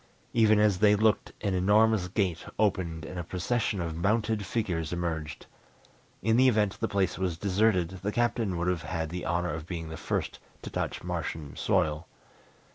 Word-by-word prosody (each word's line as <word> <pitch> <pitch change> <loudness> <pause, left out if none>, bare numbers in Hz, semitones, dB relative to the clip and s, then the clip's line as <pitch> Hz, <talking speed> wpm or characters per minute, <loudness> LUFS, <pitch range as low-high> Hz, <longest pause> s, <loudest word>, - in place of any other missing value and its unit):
Even 110 -2 +5
as 105 -3 +3
they 105 -1 +6
looked 110 +1 +2
an 100 -3 0
enormous 105 +1 +3
gate 90 -2 -1
opened 90 -6 0
and 90 +3 -6
a - - -3
procession 100 +5 -1
of 85 -2 -3
mounted 105 +3 0
figures 90 -8 -2
emerged. 80 -3 -3 0.8
In 115 0 +3
the 130 +1 +6
event 105 -5 +2
the - - 0
place 100 -2 0
was 90 -3 -1
deserted, 95 -2 +2
the 100 +2 -1
Captain 115 -5 0
would 85 +1 -1
have 90 -2 0
had 80 -2 -3
the 90 0 -4
honor 85 0 0
of 80 +1 -6
being 80 -3 -5
the 80 - -6
first - - -3 0.2
to - - -7
touch - - -3
Martian 75 -3 -4
soil. 75 +2 0
95 Hz, 175 wpm, -28 LUFS, 85-105 Hz, 0.8 s, they